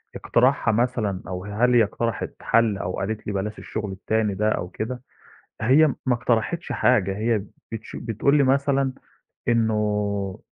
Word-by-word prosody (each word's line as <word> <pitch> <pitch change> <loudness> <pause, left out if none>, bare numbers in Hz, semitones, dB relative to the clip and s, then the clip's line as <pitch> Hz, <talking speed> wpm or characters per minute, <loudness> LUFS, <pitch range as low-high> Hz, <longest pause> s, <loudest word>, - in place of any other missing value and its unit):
اقتراحها 125 -1 +2
مثلًا 110 -4 0
أو 90 0 -5
هل 110 +5 +2
هي 120 - +7
اقترحِت 115 +1 -3
حَل 115 -3 +2
أو 90 -1 -3
قالت 105 +2 -4
لي 105 - -2
بلاش 105 +2 -3
الشغل 105 -2 -5
التاني 105 +2 -1
ده 105 +2 +1
أو 90 -4 -2
كده، 125 +6 -5 0.6
هي 135 +8 +5 0.2
ما 130 - +3
اقترحِتش 120 +8 -1
حاجة، 105 -5 +2
هي 110 -2 +1 0.3
بتش 110 -1 -7
بتقول 115 +5 +1
لي 145 - +4
مثلًا 135 0 +2 0.6
إنه، 105 -3 0
110 Hz, 150 wpm, -24 LUFS, 105-125 Hz, 0.6 s, هي